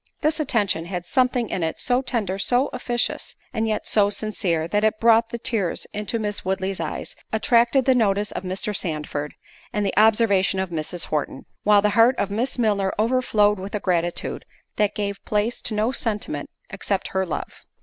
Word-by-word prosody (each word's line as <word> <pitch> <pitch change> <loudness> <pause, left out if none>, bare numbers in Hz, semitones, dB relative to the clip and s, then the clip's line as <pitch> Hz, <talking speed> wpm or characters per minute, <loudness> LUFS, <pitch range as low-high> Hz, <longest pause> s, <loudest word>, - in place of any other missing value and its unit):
This 310 +1 +1
attention 210 - 0
had 175 -1 -5
something 250 +1 +1
in 185 - -1
it 160 -1 -1
so 250 0 +1
tender, 210 -7 -1
so 250 +6 +2
officious, 245 -1 -2 0.2
and 225 -2 0
yet 215 -1 -1
so 205 -2 +3
sincere, 185 -6 -1
that 205 +4 0
it 215 0 +2
brought 230 0 +4
the 235 - -4
tears 225 -7 -1
into 210 +2 -2
Miss 210 -2 -3
Woodley's 190 0 -2
eyes, 165 -2 -4 0.2
attracted 235 +3 +3
the 260 - +5
notice 210 -4 +1
of - - -4
Mr. 190 +3 -3
Sandford, 150 -4 -3 0.4
and 210 -1 -1
the 195 - -1
observation 210 -3 +4
of 190 -2 -2
Mrs. 165 +1 -1
Horton; 145 -3 -2 0.2
while 205 -1 +4
the 210 - +3
heart 230 +4 +5
of 200 - -1
Miss 235 +7 -1
Milner 205 -5 +1
overflowed 215 -3 +2
with 195 +3 -5
a - - 0
gratitude, 175 -3 -1 0.3
that 210 -1 +1
gave 200 -1 -3
place 215 +3 -1
to 215 - -3
no 215 +3 +1
sentiment 210 - -2 0.2
except 195 0 -2
her 190 0 0
love. 170 - -5
210 Hz, 180 wpm, -23 LUFS, 190-230 Hz, 0.4 s, the